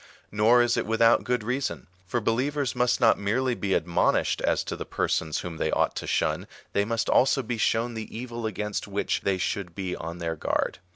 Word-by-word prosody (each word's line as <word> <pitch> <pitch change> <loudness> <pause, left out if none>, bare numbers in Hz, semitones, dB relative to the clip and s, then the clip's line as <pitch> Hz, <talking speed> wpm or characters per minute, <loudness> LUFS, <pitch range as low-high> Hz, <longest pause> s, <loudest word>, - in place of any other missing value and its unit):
Nor 115 +4 +5
is 120 0 +1
it - - -1
without 115 +1 +4
good 125 -3 -1
reason; 125 +5 -2 0.2
for 120 - 0
believers 130 +5 0
must 125 0 +2
not 115 -3 +4
merely 125 +6 0
be 100 -4 -1
admonished 85 +1 +1
as - - +1
to - - -4
the - - -5
persons 80 -1 -1
whom 85 -2 -6
they 80 - 0
ought - - +1
to - - -4
shun, - - 0 0.3
they 100 - +2
must 115 +1 -1
also 135 +1 +3
be 115 -1 -3
shown 115 +2 +1
the 110 -1 -6
evil 120 -2 -4
against 105 -1 -3
which 100 0 -1
they 95 -1 0
should 95 -1 -3
be 95 -2 -3
on 85 +1 -6
their 85 -1 -3
guard. - - -1
110 Hz, 205 wpm, -26 LUFS, 100-120 Hz, 0.3 s, Nor